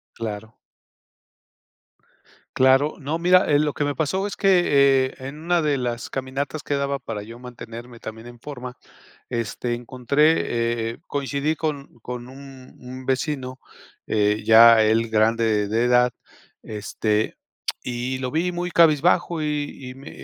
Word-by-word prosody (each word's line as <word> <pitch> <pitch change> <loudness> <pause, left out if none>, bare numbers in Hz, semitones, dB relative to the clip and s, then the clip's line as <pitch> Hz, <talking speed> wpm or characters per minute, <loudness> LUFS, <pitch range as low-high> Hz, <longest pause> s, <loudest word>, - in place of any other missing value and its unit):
Claro. 110 -1 -6 2.0
Claro. 135 +3 +4
No, 155 +3 -3
mira 180 +2 +5
eh, 145 - +5
lo 150 0 +1
que 145 - -2
me 145 0 0
pasó 175 +6 -1
es 205 - -4
que, 140 -9 +4
eh, - - -14
en 135 +3 -7
una 175 0 +2
de 150 -2 +1
las 120 -2 -3
caminatas 135 +3 -4
que - - -3
daba 140 0 -1
para 115 -6 -6
yo 115 +3 -10
mantenerme 120 -1 -10
también 110 +1 -9
en 120 0 -12
forma. 125 -2 -8 0.6
Este 120 0 -3
encontré, 120 -2 +1
eh - - -13
coincidí 145 +2 -2
con 145 -5 -4
con 125 +1 -7
un 135 -1 -13
un 130 +1 -10
vecino, 130 -1 -2 0.5
eh, 105 0 +1
ya 115 0 +8
él 110 +1 +2
grande 110 -1 +2
de 110 +3 +1
edad, 125 0 +4 0.5
este, 105 0 -2 0.4
y 125 +1 -3
lo 130 -1 -3
vi 170 +5 0
muy 175 0 -3
cabizbajo 170 +1 +3
y 150 -1 -2 0.2
y - - -9
me 135 +3 -11
130 Hz, 145 wpm, -23 LUFS, 115-145 Hz, 2.0 s, ya